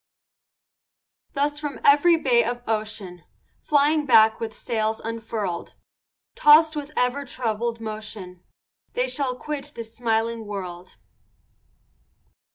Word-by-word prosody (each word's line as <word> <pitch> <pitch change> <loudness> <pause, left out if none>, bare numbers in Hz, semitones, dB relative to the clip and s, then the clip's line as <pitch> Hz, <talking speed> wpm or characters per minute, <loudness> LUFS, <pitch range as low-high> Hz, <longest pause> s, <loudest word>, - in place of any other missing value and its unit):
Thus 290 +1 0
from 295 -2 -5
every 295 +5 +6
bay 245 -6 +3
of 240 +1 -3
ocean, 215 -5 -3 0.4
Flying 295 +1 +2
back 220 -3 +6
with 225 -1 -5
sails 220 -1 -1
unfurl'd, 225 -5 -4 0.6
Tossed 310 +1 +6
with 295 0 -5
ever 250 +3 +1
troubled 235 -3 -3
motion, 215 -5 -7 0.5
They - - 0
shall 270 - -2
quit 290 +2 -6
this 230 -1 -9
smiling 225 -1 -1
world. 185 -3 -7
230 Hz, 105 wpm, -24 LUFS, 220-285 Hz, 0.6 s, every